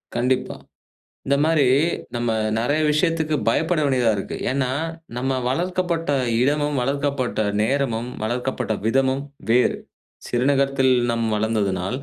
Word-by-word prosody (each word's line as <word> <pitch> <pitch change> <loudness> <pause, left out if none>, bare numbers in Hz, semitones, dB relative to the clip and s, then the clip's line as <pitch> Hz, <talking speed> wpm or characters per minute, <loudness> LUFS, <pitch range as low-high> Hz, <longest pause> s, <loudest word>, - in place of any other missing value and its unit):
கண்டிப்பா. 125 +2 0 0.7
இந்த 140 +1 +3
மாரி 155 -3 +3 0.5
நம்ம 120 0 -1 0.3
நெறைய 145 +7 +1
விஷயத்துக்கு 160 0 +1
பயப்பட 160 +6 +1
வேண்டியதா 125 -5 +2
இருக்கு. 100 - -5
ஏன்னா 130 -1 0 0.5
நம்ம 130 +1 -1
வளர்க்கப்பட்ட 175 +2 -1 0.3
இடமும், 145 +1 +1
வளர்க்கப்பட்ட 140 -2 -1 0.2
நேரமும், 120 -2 0
வளர்க்கப்பட்ட 120 0 -2
விதமும் 135 +3 +1 0.3
வேறு. 125 +2 +3 0.5
சிறுநகரத்தில் 135 +1 +2 0.2
நம் 115 -1 0
வளர்ந்ததுனால், 105 -2 -1
130 Hz, 105 wpm, -22 LUFS, 120-145 Hz, 0.7 s, இந்த